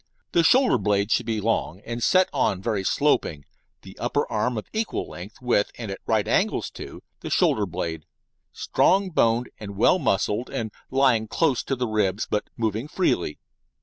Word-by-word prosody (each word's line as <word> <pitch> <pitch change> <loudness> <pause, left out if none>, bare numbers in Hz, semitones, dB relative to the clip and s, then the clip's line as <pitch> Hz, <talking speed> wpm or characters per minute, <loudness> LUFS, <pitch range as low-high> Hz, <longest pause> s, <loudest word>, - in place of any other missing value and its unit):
The 170 - +4
shoulder 255 +9 +4
blade 100 0 +1
should - - +1
be 110 -2 0
long, 100 -5 -1
and 120 0 -5
set 185 +9 +4
on 115 -9 +1
very 100 -1 -1
sloping, 95 - +1 0.4
the - - -12
upper - - 0
arm 115 +3 0
of 105 - -4
equal 220 +1 -2
length 95 +6 -10
with, 120 -4 +2
and 115 -4 -5
at 95 - -6
right - - +1
angles - - +1
to, - - -10 0.2
the - - -6
shoulder 105 -2 +2
blade, 80 -2 -4 0.5
strong 190 0 +2
boned 120 -4 +2
and 100 -2 -8
well 180 - +4
muscled, 110 - 0
and 110 -2 -4 0.2
lying 130 -5 +3
close 140 +2 +1
to 135 - -1
ribs, 110 -5 0
but 105 - -2
moving 110 +2 -1
freely. 120 - 0
110 Hz, 170 wpm, -24 LUFS, 100-135 Hz, 0.5 s, The